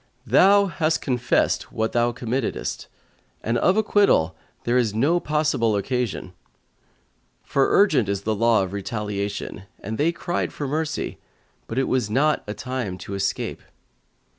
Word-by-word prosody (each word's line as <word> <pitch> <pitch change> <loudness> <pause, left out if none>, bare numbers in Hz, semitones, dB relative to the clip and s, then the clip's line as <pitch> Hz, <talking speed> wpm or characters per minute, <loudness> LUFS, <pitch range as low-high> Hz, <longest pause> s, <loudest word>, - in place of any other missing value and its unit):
"Thou 195 - +5
hast 165 -3 0
confessed 125 -3 0
what 110 0 -1
thou 120 0 +2
committedest, 120 +1 -3 0.6
and 115 - 0
of 185 +3 +3
acquittal 200 - +3 0.3
there 120 - 0
is 115 -4 +2
no 150 +10 +3
possible 150 -9 +1
occasion; 110 -3 -2 1.1
for 135 -1 +1
urgent 150 - +4
is 100 0 -2
the 110 - 0
law 115 -1 +3
of 95 0 -6
retaliation 100 -1 -4
and 110 +3 -5
they 160 +3 +3
cried 175 +1 -2
for 145 - -4
mercy 155 +3 -2 0.5
but 115 - -5
it 135 - +2
was 125 -5 0
not 145 +7 +2
a 105 - -4
time 125 -8 -4
to 95 +2 -8
escape." 100 0 -2
120 Hz, 140 wpm, -23 LUFS, 105-150 Hz, 1.1 s, Thou